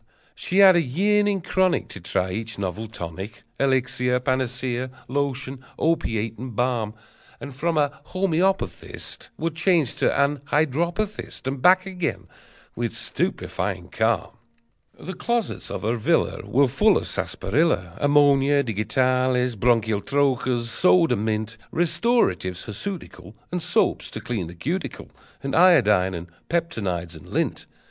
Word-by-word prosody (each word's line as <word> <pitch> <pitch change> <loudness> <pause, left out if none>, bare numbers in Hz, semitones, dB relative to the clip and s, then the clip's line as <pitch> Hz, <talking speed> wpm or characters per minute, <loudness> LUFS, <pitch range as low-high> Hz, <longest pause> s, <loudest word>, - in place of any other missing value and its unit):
She 185 - -3
had 195 -2 +8
a 175 - +4
yearning 200 +7 +1
chronic 185 +1 +1
To - - -8
try 90 +1 -1
each 110 +3 -4
novel 100 +3 -3
tonic, 95 +2 -7 0.2
Elixir, 125 -2 +1
panacea, 130 -1 -1 0.2
lotion, 135 -1 -2
opiate, 115 -9 0
and 125 -2 -7
balm; 115 -3 0 0.4
And 140 - -8
from 165 +3 -1
a 145 0 0
homoeopathist 190 0 -1
Would 165 0 -2
change 170 -6 +2
to - - +3
an 140 +1 +2
hydropathist, 170 +9 -1
And 135 0 -3
back 185 +4 +5
again, 180 -4 -3 0.5
with 120 -1 -3
stupefying 95 -2 -2
calm! 115 +1 -1 0.6
The 185 - -6
closets 235 +4 -2
of - - -5
her 115 +3 0
villa 110 - +1
Were 140 +2 +3
full 205 - +3
of - - -3
sarsaparilla, 120 - 0
Ammonia, 145 -1 +4
digitalis, 125 +2 +1
bronchial 110 -1 +2
troches, 130 -3 0
soda 170 -1 +4
mint. 110 +1 -2
Restoratives 165 - +1
hirsutical, 105 - -6 0.2
And 180 0 -2
soaps - - +1
to - - -6
clean 110 -9 -3
the 85 - -10
cuticle, 165 - -4 0.3
And 135 0 -2
iodine, 105 - +5
and 85 0 -6 0.2
peptonoids, 100 - -2
and 80 - -13
lint. - - -2
130 Hz, 130 wpm, -24 LUFS, 110-165 Hz, 0.6 s, had